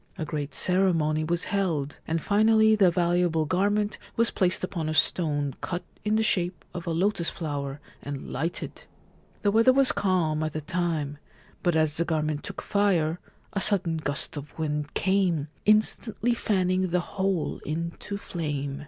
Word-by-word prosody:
A 160 - -3
great 145 -2 -4
ceremony 165 -5 +2
was 170 +2 +1
held, 165 -8 -1
and 165 +1 0
finally 220 +1 +5
the 195 -4 +5
valuable 175 -2 +2
garment 205 +5 +1 0.2
was 230 0 +3
placed 185 +1 +1
upon 170 -4 -2
a 155 - -2
stone 145 -5 +2
cut 175 -1 -3 0.2
in 210 +1 +1
the 220 - +3
shape 180 -4 0
of 175 -1 -6
a - - 0
lotus 170 +1 +1
flower 145 -3 -4 0.2
and 140 -1 -6
lighted. 165 +2 -4 0.6
The 205 - +3
weather 225 +4 +6
was 270 0 +4
calm 175 -6 +1
at 155 -1 -2
the 155 - -3
time; 155 -3 -2 0.4
but 175 -2 +1
as 155 -1 +2
the 170 - +1
garment 155 -2 -1
took - - -7
fire 180 -5 +1 0.3
a 195 - -1
sudden 180 -5 +2
gust 155 -1 -3
of 145 0 -9
wind 150 -2 -2
came, 185 -6 +1 0.2
instantly 215 +2 +2
fanning 185 -4 +1
the 180 +1 +2
whole 190 -4 -2
into 170 +6 -4
flame. 145 -7 -4
170 Hz, 160 wpm, -27 LUFS, 155-195 Hz, 0.6 s, weather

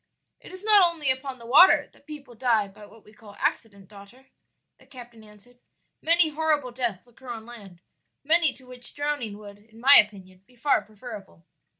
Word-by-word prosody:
"It - - -15
is 370 +1 -12
not 420 -2 +5
only 330 -6 +2
upon 260 0 -5
the 235 - -14
water 295 +10 +5
that - - -26
people 285 -5 -11
die 230 -3 0
by 205 +1 -16
what 225 0 -20
we 210 - -20
call 210 -2 -16
accident, 200 -4 -4
daughter," 210 +7 -17 0.5
the - - -22
captain 240 -4 -14
answered; 215 +4 -21 0.4
"many 335 0 +4
horrible 300 -4 -1
deaths 240 -6 -3
occur 250 +1 -16
on 225 -2 -7
land 200 -7 -14 0.4
many 315 0 +2
to 260 - -19
which 250 -1 -6
drowning 290 -8 -4
would 205 -1 -13
in 220 +2 -21
my 275 +4 +8
opinion 190 -3 0
be 250 - -25
far 280 +4 +1
preferable. 210 - -13
240 Hz, 185 wpm, -24 LUFS, 210-280 Hz, 0.5 s, my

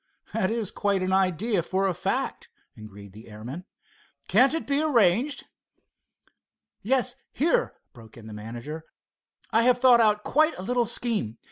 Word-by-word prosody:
"That 220 -4 0
is 225 -3 -2
quite 200 -2 0
an 185 0 -1
idea 190 +2 +1
for 190 +3 -1
a 190 - 0
fact," - - -3 0.3
agreed 100 -2 -12
the 110 +2 -13
airman. 120 +12 -8 0.6
"Can't 265 +4 +4
it 325 - -3
be 280 +1 0
arranged?" 245 - +2 1.4
"Yes, 255 +1 0 0.2
here," 340 - +1 0.2
broke 115 -3 -15
in 115 - -12
the 110 - -9
manager. 120 +9 -7 0.7
"I 225 - +4
have 245 +1 +4
thought 245 -2 +6
out 210 -1 +2
quite 310 +2 +2
a 185 - -6
little 245 +3 +1
scheme. 215 - -2
200 Hz, 150 wpm, -26 LUFS, -, 1.4 s, thought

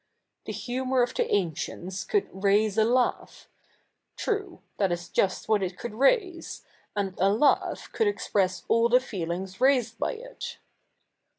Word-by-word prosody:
The - - -2
humour 255 0 0
of 240 - -2
the - - +1
ancie7its 185 +1 -2
could 415 - +1
7'aise 200 +2 +2
a - - +6
laugh; 245 +2 0 0.7
t7'ue 405 -5 -2
— - - -45
that 195 -3 +2
is 175 0 -3
just 190 -2 0
what 215 -2 +3
it 180 -1 -3
could 235 +2 -6
raise, 345 - +1 0.3
and 195 -2 -1
a 195 +2 +4
laugh 255 +8 +2
could 445 - +2
express 195 - 0
all 230 +1 +3
the 250 +1 +6
feelings 185 -4 -5
raised 250 -4 +3
by - - 0
it. - - -8
220 Hz, 155 wpm, -27 LUFS, 190-265 Hz, 0.7 s, a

